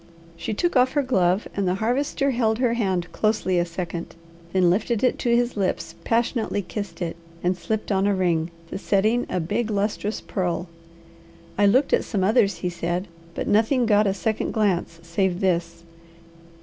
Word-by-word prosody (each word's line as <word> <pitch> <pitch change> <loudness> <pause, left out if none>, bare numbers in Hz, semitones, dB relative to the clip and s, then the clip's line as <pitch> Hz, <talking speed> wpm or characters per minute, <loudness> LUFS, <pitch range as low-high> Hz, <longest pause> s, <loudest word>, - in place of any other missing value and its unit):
She 215 +5 -4
took 345 +8 0
off 255 0 +4
her 290 -2 +2
glove 190 -6 +2
and 200 -2 0
the 180 - +1
Harvester 270 +6 0
held 225 -3 +1
her 245 -1 +2
hand 190 -7 -1
closely 210 -4 +1
a 175 - +1
second, 170 -1 -5 0.4
then 185 -2 +3
lifted 220 +4 0
it 255 - +2
to 235 -1 +2
his 240 +1 +1
lips, 195 -3 -1
passionately 230 -3 0
kissed 200 -1 -5
it 165 - -3 0.3
and 180 +1 +2
slipped 210 +5 -3
on 195 0 +2
a 205 - +2
ring, 170 -3 +1 0.2
the - - -4
setting 215 +5 +1
a 180 - -1
big, 210 +7 -1
lustrous 205 +1 -1
pearl. 180 -2 -2 0.9
"I 205 0 +4
looked 260 +8 +3
at - - +3
some 200 -5 -1
others," 210 0 +3
he - - +3
said, 175 +2 -3 0.3
"but - - -3
nothing 225 +4 +3
got 210 -1 +4
a 195 - +2
second 215 +3 -1
glance 185 -6 0
save 175 +2 0
this. 170 -3 -1
200 Hz, 175 wpm, -24 LUFS, 180-230 Hz, 0.9 s, off